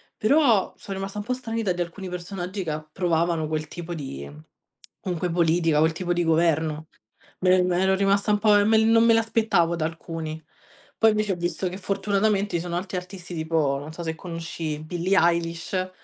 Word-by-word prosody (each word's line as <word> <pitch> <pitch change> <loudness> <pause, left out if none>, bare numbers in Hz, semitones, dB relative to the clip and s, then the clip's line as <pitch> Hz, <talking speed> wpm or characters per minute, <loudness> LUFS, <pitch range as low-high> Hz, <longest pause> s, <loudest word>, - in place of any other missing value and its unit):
però 235 -4 +3
sono 195 -2 -7
rimasta 195 +1 -5
un 205 - -3
po' 250 +3 -1
stranita 225 -5 -2
di 175 - -3
alcuni 180 +3 -5
personaggi 180 +2 -5
che 165 - -4
approvavano 160 +1 -1
quel 155 0 -2
tipo 175 +2 -6
di, 70 - -6 0.7
comunque 180 -1 -2
politica, 165 -2 +2
quel 160 +1 +4
tipo 175 +1 -1
di 175 0 0
governo. 160 -1 +1 0.5
Me 185 - +2
l'e 185 0 +5
me 180 -1 +1
l'ero 190 +1 +3
rimasta 200 +1 +2
un 210 - +4
po' 210 0 +4
ehm, 205 - +3
me 220 0 +5
l 220 - +4
non 225 0 +5
me 230 - +6
l'aspettavo 220 -7 +2
da 155 -2 -1
alcuni. 160 -1 -5 0.6
Poi 225 - +6
invece 215 -1 0
ho 185 - 0
visto 175 +2 -2
che 180 +1 -5
fortunatamente 200 0 0
ci - - -3
sono 175 -1 -4
alti 185 +1 -5
artisti 180 -1 -7
tipo, 160 -4 0
non 145 +2 -8
so 170 - -6
se 160 -1 -2
conosci 165 -2 -5
Billie 180 +4 0
Eilish, 170 +2 0
175 Hz, 195 wpm, -25 LUFS, 165-195 Hz, 0.7 s, me